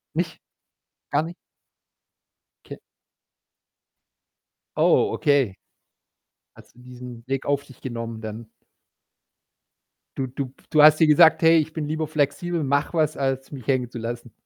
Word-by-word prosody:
Nicht? 165 -1 -2 0.7
Gar 145 +2 +2
nicht? 170 +2 -8 1.3
Okay. - - -9 2.0
Oh, 425 - +3
okay. 140 - +1 1.0
Hattest - - -18
du - - -19
diesen 125 -1 -11
Weg 135 0 -2
auf 140 0 0
dich 135 -3 -18
genommen 115 -3 -6
dann? 110 +1 -7 1.7
Du 130 -1 -2
du 135 +2 -4
pf 130 - -23
du 155 - +4
hast 155 +1 +7
dir 160 - +5
gesagt: 160 +2 +6
„Hey, 165 0 +6
ich 155 0 -1
bin 155 -2 -3
lieber 155 0 -2
flexibel, 155 +3 -1
mach 140 +4 0
was, 155 -2 0
als 135 0 -2
mich 130 -6 -9
hängen 130 -3 0
zu 120 - -9
lassen.“ 120 0 -6
140 Hz, 135 wpm, -23 LUFS, 125-155 Hz, 2.0 s, hast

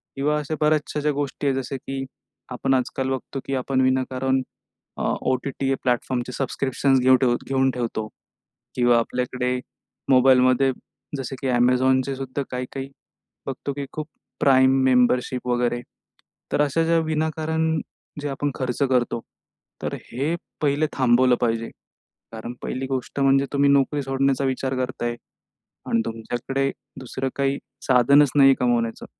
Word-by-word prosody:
किंवा 150 +2 +1
अशा 150 +1 -3
बऱ्याचशा 150 0 +1
अशा 150 +1 +1
गोष्टी 145 0 -3
आहेत. 135 -1 +1
जसे 135 +1 -3
की 135 +1 -5 0.5
आपण 125 +1 0
आजकाल 130 +1 -1
बघतो, 135 +1 -4
की 135 - -2
आपण 130 +1 0
विनाकारण 130 0 +1 0.6
अ, - - -3 0.2
ओ-टी-टी 135 +1 0
प्लॅटफॉर्मचे 125 0 -1
सबस्क्रिप्शन्स 135 0 +1
घेऊन 130 +1 +5
ठेवतो 120 -2 +2
घेऊन 135 0 +3
ठेवतो 115 -3 -3 0.7
किंवा 120 -1 +4
आपल्याकडे 125 +1 -1 0.5
मोबाईलमध्ये, 130 0 +5 0.5
जसं 135 0 -5
की 135 - -1
Amazonचे 130 +2 +3
सुद्धा 135 +1 -4
काही-काही 130 +2 -5 0.6
बघतो, 135 +1 -4
की 140 0 -4
खूप 155 -1 -5 0.3
प्राइम 130 -1 +5
मेंबरशिप 125 0 +2
वगैरे. 120 0 0 0.7
तर - - +3
अशा 150 +3 +2
ज्या 165 0 +3
विनाकारण 160 +1 0 0.4
जे 145 - -3
आपण 140 +1 -2
खर्च 130 +1 -3
करतो, 120 -2 +1 0.6
तर - - -2 0.2
हे 140 +8 -1 0.3
पहिले 150 +1 +2
थांबवलं 125 -1 +4
पाहिजे. 115 -1 0 0.6
कारण 115 +2 -6
पहिली 130 +1 -3
गोष्ट 135 +1 -3
म्हणजे 135 0 +4
तुम्ही 140 0 +3
नोकरी 140 +1 +2
सोडण्याचा 135 0 +1
विचार 130 0 -1
करताय 120 -2 -4 0.7
आणि 115 - +2
तुमच्याकडे 120 +4 -2 0.3
दुसरं 130 +1 -4
काही 140 0 0 0.3
साधनच 135 +2 +5
नाही 135 -1 +7
कमवण्याचं. 120 -2 0
130 Hz, 135 wpm, -23 LUFS, 125-140 Hz, 0.7 s, नाही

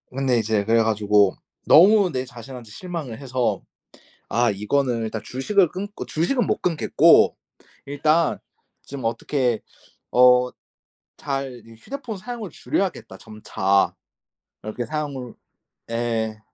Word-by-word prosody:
근데 130 -3 +1
이제 110 -1 0
그래 115 +1 +3
가지고 105 -3 +3 0.3
너무 195 +2 +6
내 130 -1 -3
자신한테 125 -2 -11
실망을 155 -3 -6
해서 130 -3 -1 0.7
아 120 0 +2
이거는 115 +4 0
일단 110 -1 -4
주식을 180 +9 +1
끊고 200 +4 -6
주식은 235 - 0
못 - - -1
끊겠고 165 -4 +4 0.5
일단 155 +3 +1 0.5
좀 135 -4 -7
어떻게 120 0 -1 0.5
어 125 0 +5 0.7
잘 135 -4 -4
이 115 - -15
'휴대폰 235 - -7
사용을 230 -2 -7
줄여야겠다.' 180 - -3
점차. 100 -3 0 0.7
이렇게 110 +3 -4
사용을 140 -6 -5 0.6
예.' 115 -2 -2
125 Hz, 245 characters per minute, -23 LUFS, 115-155 Hz, 0.7 s, 너무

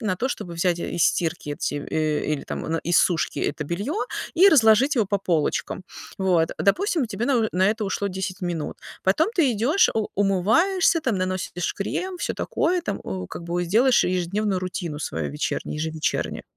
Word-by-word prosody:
на 185 - 0
то, 255 +7 -1
чтобы 175 -8 -5
взять 175 0 +1
из 170 -1 0
стирки 165 -3 0
эти, 145 - -3
э, 155 +1 -1
или 140 - -6
там - - -5
а - - -5
на 165 - 0
из 175 - +4
сушки 170 -3 +1
это 150 0 -2
белье 200 - -3 0.4
и 375 +4 +7
разложить 260 - +5
его 220 -4 +2
по 200 0 0
полочкам. 170 0 -1 0.4
Вот, 180 -4 +2
допустим, 315 - +1
тебе 220 +2 -3
на, 275 - +2
э 220 - 0
на 185 +2 +3
это 220 0 -1
ушло 200 +1 -1
10 190 +1 -4
минут, 170 -4 -3 0.3
потом 305 - +3
ты 295 -9 +3
идёшь, 260 - +3
у 220 -2 0
умываешься, 225 - +3
там, 230 -6 0
наносишь 185 -1 -2
крем, 365 - -3
всё - - -2
такое 355 +2 0
там, 205 - -3
у 95 -1 -4
как 170 - -8
бы 175 +1 -1
сделаешь 235 +8 +4
ежедневную 185 +2 0
рутину 175 -4 -4
свою - - -3
вечернюю, 150 +1 -3
ежевечернюю. 160 0 -2
190 Hz, 185 wpm, -24 LUFS, 170-235 Hz, 0.4 s, и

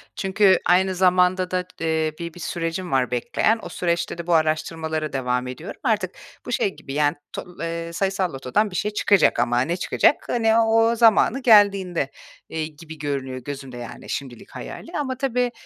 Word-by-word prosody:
Çünkü 190 0 +3
aynı 185 +1 +3
zamanda 180 0 +3
da, 180 0 -1
eee, 160 -1 0
bi 170 -1 -5
bir 175 - -12
sürecim 170 +1 -3
var 130 -2 +1
bekleyen. 215 - +1
O - - -6
süreçte 170 -1 -1
de 170 0 -7
bu 175 - +2
araştırmalara 155 0 0
devam 125 -1 -1
ediyorum. 130 +8 -8
Artık, 205 -5 +1 0.3
bu - - -5
şey 200 -5 0
gibi, 135 - -9
yani, 145 +1 +2 0.2
to - - -5 0.2
eee, 170 0 -4
sayısal 190 -1 -1
lotodan 135 +11 0
bir - - -8
şey 210 +3 -1
çıkacak 200 - +3
ama 120 0 +2
ne 165 +6 0
çıkacak? 235 - +3
Hani, 225 -2 +2
o 225 +1 +3
zamanı 230 +2 +4
geldiğinde, 200 - +4 0.4
eee, 160 -1 -3
gibi 160 +1 -12
görünüyor 140 -3 -3
gözümde, 135 -1 -7
yani, 120 -1 -9
şimdilik 130 -4 -6
hayalî. 330 - -8
Ama, 260 -3 -2
tabii, 250 -2 0
170 Hz, 175 wpm, -23 LUFS, 150-200 Hz, 0.4 s, zamanı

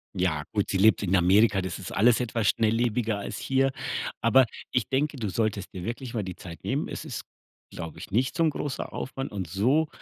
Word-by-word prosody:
Ja 85 -5 0
gut, 105 -2 0
sie 95 - +1
lebt 105 +1 +5
in 95 0 +2
Amerika, 95 +3 +4
das 95 0 -4
ist 90 - -7
alles 115 +4 +4
etwas 115 -3 -1
schnelllebiger 115 -1 +1
als - - -5
hier. 135 0 +1 0.5
Aber 130 +2 +6 0.3
ich 125 -4 +1
denke, 140 +2 0
du 110 -5 -2
solltest 100 -1 -1
dir 90 -2 -6
wirklich 120 +2 -5
mal 110 -3 -1
die 90 -1 -6
Zeit 85 -2 -10
nehmen. - - -1
Es - - -6
ist, - - -5 0.5
glaube 85 -1 -7
ich, - - -9
nicht 125 +5 +1
so 165 - +2
'n 160 - +4
großer 145 -2 -4
Aufwand 135 +1 -4
und 95 -5 -4
so 130 - +2
110 Hz, 210 wpm, -27 LUFS, 95-125 Hz, 0.5 s, Aber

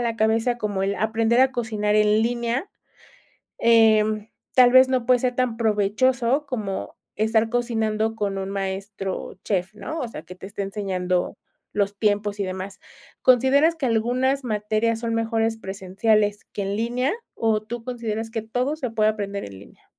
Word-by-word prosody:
la 230 -1 -1
cabeza 225 +2 +1
como 205 -3 -2
el 200 +1 0
aprender 225 +3 +2
a 260 0 +4
cocinar 215 -4 -1
en 210 0 +4
línea. 235 - -1 0.9
Em, 220 -2 +4 0.3
tal 250 -1 +7
vez 260 +1 +7
no 255 -2 0
puede 250 -1 +5
ser 250 0 -1
tan 250 -3 0
provechoso 235 +5 +1
como 205 - -4 0.2
estar 220 +1 +2
cocinando 225 -2 -1
con 200 -2 -2
un 195 0 -4
maestro 195 -1 -4
chef, 190 -1 -1
¿no?, 310 +11 -5
o 245 - -3
sea, 155 - -8
que 180 +2 -11
te 190 - -10
esté 200 - -5
enseñando 185 -3 -2 0.4
los 200 0 0
tiempos 205 -1 0
y 200 - +1
demás, 190 +1 -6 0.4
¿consideras 265 +6 +4
que 285 -5 -1
algunas 250 +4 +1
materias 220 0 0
son 230 -1 -2
mejores 225 0 0
presenciales 205 +2 0
que 200 - -3
en 195 +1 -2
línea, 245 - 0 0.2
o 220 -2 +1
tú 230 +1 -7
consideras 225 -3 -4
que 225 -2 -3
todo 250 +6 -1
se 265 -6 -4
puede 215 -1 +2
aprender 200 -2 -4
en 95 -1 -10
línea? - - -18
220 Hz, 165 wpm, -23 LUFS, 205-240 Hz, 0.9 s, tal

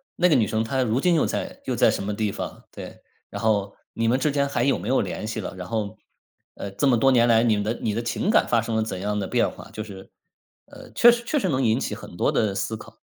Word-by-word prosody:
那 180 - +3
个 155 - +4
女 115 -5 +4
生 110 +2 0
她 130 +4 -1
如 115 +1 0
今 175 +4 +3
又 155 - +3
在 - - -4
又 - - -1
在 - - +4
什 - - -3
么 105 - -2
地 105 -1 -1
方， - - -7
对。 - - -10 0.3
然 - - -6
后 105 -3 0 0.2
你 115 0 -1
们 125 +3 +2
之 150 +2 +1
间 140 0 +1
还 120 -3 -1
有 135 +1 +2
没 95 +6 -7
有 135 - +3
联 - - -4
系 110 0 -3
了， 95 - -6
然 90 -1 -7
后， 110 -3 -3 0.6
呃， 100 - -6
这 100 +8 0
么 125 - +4
多 135 +4 +4
年 120 -2 +4
来 115 -1 +4
你 115 -2 +3
们 105 - -1
的 110 +3 -1
你 105 - -1
的 115 - -1
情 120 - -2
感 - - +4
发 115 -1 +2
生 115 0 -3
了 110 - +2
怎 95 -4 -5
样 105 0 -1
的 95 - -3
变 - - +1
化。 - - -12
就 110 - -5
是， 100 -3 -11 0.6
呃， - - -13
确 240 - +7
实 235 0 -2
确 295 +5 0
实 215 - -1
能 135 -3 +1
引 115 +1 +2
起 105 - -3
很 85 - -11
多 - - +2
的 105 -3 +1
思 110 +2 -2
考。 - - -14
115 Hz, 305 characters per minute, -24 LUFS, 105-130 Hz, 0.6 s, 确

